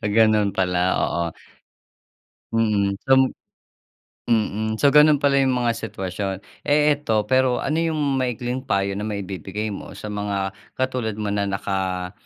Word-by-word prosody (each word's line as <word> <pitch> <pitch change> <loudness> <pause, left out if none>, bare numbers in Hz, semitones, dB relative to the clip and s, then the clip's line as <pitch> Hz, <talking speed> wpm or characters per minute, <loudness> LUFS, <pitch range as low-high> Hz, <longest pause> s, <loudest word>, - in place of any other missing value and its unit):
Gano'n 110 -2 +4
pala, 90 -1 +1 0.2
oo. 85 - 0 1.3
Mhm, 105 -3 +1
so 135 - +2 1.2
mm. 110 -1 +1
So, 145 - +6
gano'n 150 -1 +6
pala 140 -1 +3
yung 130 -1 +2
mga 120 -1 +1
sitwasyon. 95 -2 -4 0.3
Eh, 150 0 +4
ito 110 -7 0
pero 130 -1 +3
ano 150 +3 -1
yung 160 -2 0 0.2
maikling 125 0 -2
payo 100 -5 0
na 105 - -3
maibibigay 100 0 -4
mo - - -8
sa 105 - -7
mga 100 -2 -2 0.2
katulad 130 -4 -1
mo 105 -1 -2
na 100 0 0
naka, 95 -2 -2
110 Hz, 135 wpm, -22 LUFS, 100-130 Hz, 1.3 s, So